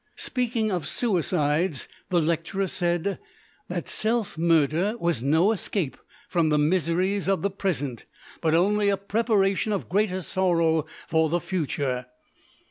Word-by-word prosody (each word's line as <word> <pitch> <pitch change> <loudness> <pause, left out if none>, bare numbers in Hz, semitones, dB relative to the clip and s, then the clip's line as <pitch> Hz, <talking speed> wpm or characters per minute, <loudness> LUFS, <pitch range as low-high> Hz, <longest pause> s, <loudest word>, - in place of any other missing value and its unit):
Speaking 235 -4 0
of 180 -4 -2
suicides, 170 - 0 0.2
the 175 - +3
lecturer 170 +4 0
said 175 +1 -1 0.5
that - - -4
self 225 -1 0
murder 165 - +2
was 170 - 0
no 160 - +3
escape 190 -7 -1 0.3
from 170 -3 +1
the 150 - +3
miseries 180 +5 +1
of 195 -1 +1
the 200 - +1
present, 145 - -3 0.4
but 160 -1 +2
only 205 +4 +3
a 200 - +2
preparation 200 0 +1
of 200 - -2
greater 190 -2 0
sorrow 165 -2 +1 0.2
for 160 -1 +2
the 175 +2 +1
future. 140 -8 -2
180 Hz, 130 wpm, -25 LUFS, 160-200 Hz, 0.5 s, the